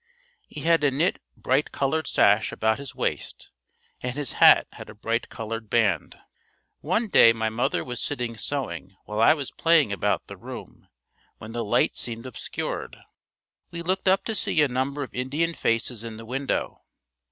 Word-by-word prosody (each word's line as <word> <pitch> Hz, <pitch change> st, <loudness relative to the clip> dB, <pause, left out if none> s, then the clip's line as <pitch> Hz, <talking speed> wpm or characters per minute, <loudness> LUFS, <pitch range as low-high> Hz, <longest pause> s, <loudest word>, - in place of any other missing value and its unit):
He -, -, -8 dB
had 165 Hz, -2 st, +3 dB
a 145 Hz, -, +5 dB
knit 150 Hz, +7 st, 0 dB, 0.2 s
bright 135 Hz, +3 st, +1 dB
colored 145 Hz, +2 st, -1 dB
sash 105 Hz, +2 st, +4 dB
about 110 Hz, +2 st, 0 dB
his 140 Hz, -2 st, -8 dB
waist -, -, -3 dB, 0.5 s
and 125 Hz, 0 st, -3 dB
his 145 Hz, -4 st, -3 dB
hat -, -, +7 dB
had -, -, -11 dB
a -, -, -11 dB
bright 115 Hz, +3 st, -2 dB
colored 115 Hz, -1 st, -6 dB
band. 105 Hz, -9 st, +1 dB, 0.6 s
One 200 Hz, +9 st, 0 dB
day 115 Hz, -, +7 dB
my 110 Hz, -1 st, -1 dB
mother 115 Hz, +3 st, 0 dB
was 125 Hz, -1 st, -5 dB
sitting 125 Hz, -5 st, -2 dB
sewing 95 Hz, -, -4 dB
while 105 Hz, +1 st, -2 dB
I 115 Hz, -, +6 dB
was 140 Hz, -4 st, -5 dB
playing 160 Hz, -10 st, +3 dB
about 100 Hz, -, 0 dB
the -, -, -10 dB
room, -, -, -10 dB, 0.5 s
when 110 Hz, -, -9 dB
the 120 Hz, 0 st, -3 dB
light 105 Hz, -, +2 dB
seemed 115 Hz, 0 st, -3 dB
obscured. 130 Hz, -, -5 dB, 0.7 s
We 170 Hz, 0 st, -6 dB
looked 185 Hz, +2 st, -1 dB
up 190 Hz, +1 st, +3 dB
to 220 Hz, -, -1 dB
see 190 Hz, -, +1 dB
a -, -, +3 dB
number 135 Hz, +3 st, -2 dB
of 135 Hz, -, -9 dB
Indian 145 Hz, +7 st, -1 dB
faces 115 Hz, -4 st, -1 dB
in 115 Hz, -1 st, -7 dB
the 115 Hz, -, -9 dB
window. 135 Hz, +3 st, -2 dB
125 Hz, 175 wpm, -25 LUFS, 115-145 Hz, 0.7 s, hat